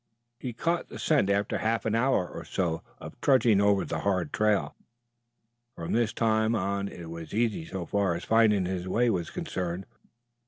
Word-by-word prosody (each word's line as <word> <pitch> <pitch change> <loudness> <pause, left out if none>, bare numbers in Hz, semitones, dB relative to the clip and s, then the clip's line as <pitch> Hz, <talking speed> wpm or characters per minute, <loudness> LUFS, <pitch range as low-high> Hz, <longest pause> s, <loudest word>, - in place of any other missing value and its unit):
He 125 - -4
caught 170 +8 -1
the - - -8
scent 150 -11 +2
after 100 +1 +1
half 110 -1 0
an 110 - 0
hour 115 -5 +2
or - - -8
so 85 -3 -1 0.2
of - - -11
trudging 120 -7 +4
over 100 -1 +3
the - - -3
hard 95 -6 -1
trail. 105 -2 +1 1.0
From 85 - -5
this 115 -1 +2
time 110 0 +2
on 100 -1 -1
it 85 -4 -9
was 85 +2 -7
easy 110 -8 0
so 95 -3 -5
far 100 -3 +1
as 85 - -5
finding 110 -4 +4
his 90 0 -3
way 120 +5 +2
was 85 -5 -2
concerned. 90 +1 -4
100 Hz, 180 wpm, -28 LUFS, 90-115 Hz, 1.0 s, trudging